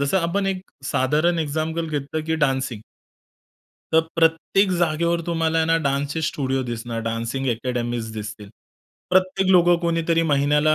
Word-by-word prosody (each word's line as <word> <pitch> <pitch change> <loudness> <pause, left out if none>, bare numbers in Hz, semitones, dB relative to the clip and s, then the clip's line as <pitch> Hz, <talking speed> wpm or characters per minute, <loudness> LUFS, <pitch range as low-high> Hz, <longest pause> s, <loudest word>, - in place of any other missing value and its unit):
जसं 140 +7 +2
आपण 185 +3 0
एक 190 -1 -1 0.2
साधारण 150 +7 +1
एक्झाम्पल 160 +2 -2
घेतलं, 150 +1 -3
की 160 0 0
डान्सिंग 135 -7 0 1.1
तर 160 - +6 0.2
प्रत्येक 165 +4 +3
जागेवर 170 0 +1
तुम्हाला 165 -1 +1
आहे 160 - +2
ना, 165 0 +3
डान्सचे 140 +3 -1
स्टुडिओ 135 -4 -1
दिसणार. 120 -1 -4
डान्सिंग 115 +4 -3
अकॅडमीज 120 -1 -3
दिसतील. 105 -1 -7 0.6
प्रत्येक 185 +1 +2
लोकं 175 -1 +6
कोणीतरी 165 -1 +1
महिन्याला 150 +2 +3
155 Hz, 135 wpm, -22 LUFS, 130-170 Hz, 1.1 s, तर